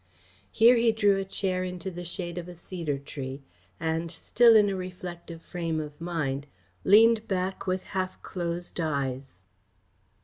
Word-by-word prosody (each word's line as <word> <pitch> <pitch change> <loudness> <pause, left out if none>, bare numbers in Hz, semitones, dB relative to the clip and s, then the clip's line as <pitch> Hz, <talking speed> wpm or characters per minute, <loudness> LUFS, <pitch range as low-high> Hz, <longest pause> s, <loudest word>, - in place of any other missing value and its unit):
Here 235 +2 +6
he 230 0 +4
drew 205 -3 +3
a 195 - -1
chair 190 -1 -1
into 180 0 -4
the 175 0 -7
shade 175 0 -3
of 175 - -7
a 175 - -9
cedar 165 -4 -4
tree 135 -1 -7 0.4
and, 165 +1 -1
still 230 +7 +4
in 210 -1 +6
a 195 - -1
reflective 180 -2 -7
frame 165 -2 -3
of 150 0 -7
mind, 150 -5 -2 0.4
leaned 220 +2 +6
back 190 0 -2
with 185 0 0
half 185 -1 -2
closed 175 -1 -4
eyes. 135 - -3
175 Hz, 150 wpm, -28 LUFS, 160-190 Hz, 0.4 s, Here